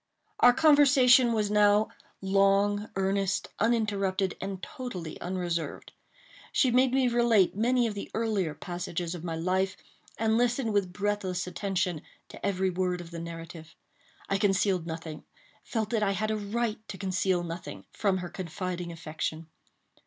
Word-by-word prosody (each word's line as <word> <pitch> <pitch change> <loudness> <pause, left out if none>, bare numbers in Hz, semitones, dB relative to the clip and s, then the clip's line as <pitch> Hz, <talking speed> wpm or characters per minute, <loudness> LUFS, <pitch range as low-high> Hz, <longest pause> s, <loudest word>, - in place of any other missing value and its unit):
Our 245 - +8
conversation 270 -4 +6
was 210 -2 0
now 210 0 +4 0.3
long, 195 +2 +2
earnest, 195 0 0
uninterrupted, 200 -4 +1
and 195 -1 -4
totally 185 -11 -6
unreserved. 175 -4 -3 0.6
She 260 - +3
made 255 +1 +4
me 260 -1 +3
relate 235 -6 +3
many 240 +3 +2
of 225 - -1
the 200 - -6
earlier 205 -8 0
passages 175 0 -4
of 175 -2 -7
my 165 -2 -3
life, 185 +3 0 0.4
and 225 0 +2
listened 245 -1 +1
with 200 -3 +1
breathless 200 -2 -2
attention 180 -3 -2 0.3
to - - -12
every 190 -1 0
word 180 0 -1
of 175 -1 -9
the 170 - -6
narrative. 165 -1 -9 0.5
I 195 - 0
concealed 195 -3 +1
nothing—felt 165 +7 -6
that 225 -2 +1
I 200 -1 +2
had 215 +3 -1
a - - 0
right 215 +2 -2
to 195 - -7
conceal 185 -2 0
nothing—from 180 +3 -3
her 180 -1 -5
confiding 180 -1 -5
affection. 160 -1 -5
195 Hz, 140 wpm, -28 LUFS, 180-220 Hz, 0.6 s, Our